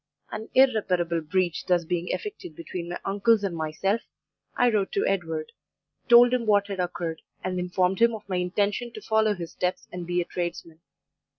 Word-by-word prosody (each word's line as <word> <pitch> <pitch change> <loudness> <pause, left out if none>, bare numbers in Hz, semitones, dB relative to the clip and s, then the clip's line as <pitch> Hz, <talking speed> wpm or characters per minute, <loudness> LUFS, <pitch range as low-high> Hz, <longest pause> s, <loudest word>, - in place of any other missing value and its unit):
"An 220 +1 -6
irreparable 185 -10 +3
breach 175 +1 0
thus 175 -2 +2
being 175 +1 -2
effected 410 - -5
between 170 +1 -6
my 175 - -4
uncles 205 +2 +3
and 190 -4 -2
myself, 165 +7 -1 0.6
I 245 -1 +4
wrote 200 -3 0
to 400 - +1
Edward; 165 -2 -2 0.6
told 240 +1 +8
him 240 -3 0
what 205 -1 +4
had 195 -2 -4
occurred, 170 -2 -3 0.2
and 185 -1 -2
informed 180 +1 0
him 235 -1 +5
of 210 -1 -11
my 185 -2 -1
intention 200 +6 -1
to 215 - -8
follow 220 -1 +2
his 170 -3 -7
steps 180 0 -2
and 175 -1 -6
be 175 0 0
a 175 - 0
tradesman. 170 -2 -5
185 Hz, 180 wpm, -26 LUFS, 175-215 Hz, 0.6 s, told